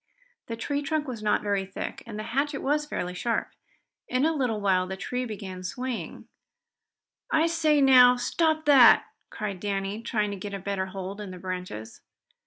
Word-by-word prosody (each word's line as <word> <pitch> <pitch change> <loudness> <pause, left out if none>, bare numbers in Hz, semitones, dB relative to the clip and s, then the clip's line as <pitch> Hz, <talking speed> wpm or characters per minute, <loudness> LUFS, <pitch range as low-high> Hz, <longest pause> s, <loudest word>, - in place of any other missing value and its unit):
The 230 - -4
tree 285 +5 -2
trunk 305 +1 -1
was 240 -4 -5
not 210 -1 +1
very 200 -2 0
thick, 190 0 -6
and 215 -2 -7
the 215 - -4
hatchet 280 +2 0
was 300 +2 +1
fairly 180 -10 -3
sharp. 230 +5 -2 0.6
In 255 +3 +1
a 325 - +2
little 250 -7 -1
while 185 -2 +2
the 190 0 -5
tree 250 +5 -3
began 195 -5 -7
swaying. 250 +6 -5 1.0
"I 320 +1 +3
say 320 -3 +2
now, 250 -2 +8
stop 315 +5 0
that!" 270 -5 +7 0.2
cried 200 -4 -5
Danny, 200 +2 -3
trying 215 -3 -1
to 200 - -5
get 200 +1 -6
a - - -5
better 190 0 -2
hold 195 +2 -6
in 205 - -6
the 185 - -8
branches. 180 - -6
215 Hz, 180 wpm, -27 LUFS, 195-270 Hz, 1.0 s, now